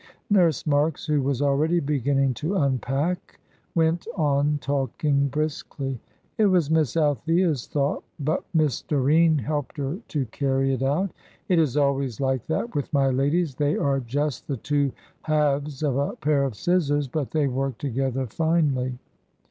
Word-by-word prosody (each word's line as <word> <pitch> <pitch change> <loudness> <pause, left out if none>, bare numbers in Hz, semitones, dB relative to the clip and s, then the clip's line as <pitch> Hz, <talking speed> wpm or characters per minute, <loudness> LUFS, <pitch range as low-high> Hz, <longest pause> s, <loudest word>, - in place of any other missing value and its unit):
Nurse 175 -8 +3
Marks, 150 +1 +1
who 150 -2 +1
was 135 0 0
already 150 +5 +2
beginning 140 -2 +1
to 155 +10 -3
unpack, 140 +3 -1 0.4
went 165 +2 +1
on 145 -1 +2
talking 140 +1 0
briskly. 140 -3 -3 0.4
"It 215 - +5
was 175 -6 +2
Miss 160 -1 +2
Althea's 155 - +1
thought, 140 -1 -1 0.2
but 155 +4 -1
Miss 155 -7 +1
Doreen 155 +3 +3
helped 145 +3 -3
her 145 +6 -3
to 145 -4 -1
carry 135 0 +1
it 130 - -2
out. 155 +8 +1 0.4
It 180 -3 +4
is 150 -4 +1
always 140 -5 +1
like 130 -3 -1
that 230 +9 -2
with 145 - -3
my 135 -2 +3
ladies, 145 +4 +1
they 145 +2 0
are 140 -1 +1
just 135 +2 -2
the 140 - -2
two 145 +2 0 0.3
halves 150 -2 0
of 140 -3 +1
a 140 - -1
pair 145 -2 +1
of 130 -5 -3
scissors, 145 - +1
but 140 +1 -3
they 155 -2 +1
work 135 -1 -2
together 135 -1 -1
finely. 140 -2 0
145 Hz, 155 wpm, -25 LUFS, 135-155 Hz, 0.4 s, It